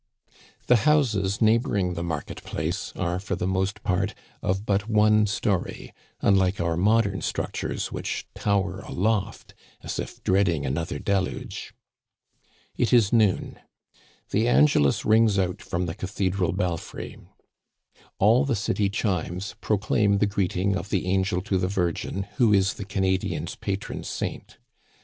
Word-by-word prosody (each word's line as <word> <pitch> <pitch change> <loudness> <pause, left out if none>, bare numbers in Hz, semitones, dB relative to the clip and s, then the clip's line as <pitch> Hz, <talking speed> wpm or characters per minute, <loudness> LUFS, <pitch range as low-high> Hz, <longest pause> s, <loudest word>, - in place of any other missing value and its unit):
The 125 - +5
houses 110 -8 +2
neighboring 110 -5 +2
the 85 - -4
market 80 -4 -4
place 85 +6 -3
are, 90 0 -1
for 100 0 -3
the 90 - -3
most 95 +2 -1
part, 100 -1 0 0.3
of 95 +3 -1
but 100 +2 0
one 105 0 +4
story, 100 -2 -2 0.3
unlike 95 -1 +3
our 85 -1 0
modern 100 +2 +2
structures, - - -3
which - - -4
tower 100 -2 0
aloft 100 +1 -2 0.3
as - - -4
if - - -6
dreading 95 -6 +2
another 75 +3 -2
deluge. 95 +2 -3 1.0
It - - +1
is 115 -4 +4
noon. 110 -5 +2 0.7
The 110 +3 +2
Angelus 120 - +4
rings 110 -2 +4
out 90 -2 -1
from 90 +1 -2
the 80 - -3
cathe 95 0 -2
dral 90 -2 0
belfry. 90 -4 -3 1.0
All 115 +7 +5
the 135 -4 0
city 100 -1 0
chimes 95 -2 -2
proclaim 105 0 +2
the 105 - +3
greeting 100 -1 0
of 95 +2 -4
the 95 -3 0
angel 95 0 0
to 100 -2 0
the 90 - 0
Virgin, 95 0 -1
who 120 -5 +4
is 95 -1 +3
the 100 - -7
Canadian's 95 -1 -1
pa 100 - -3
tron - - -7
saint. - - -5
95 Hz, 140 wpm, -25 LUFS, 90-105 Hz, 1.0 s, The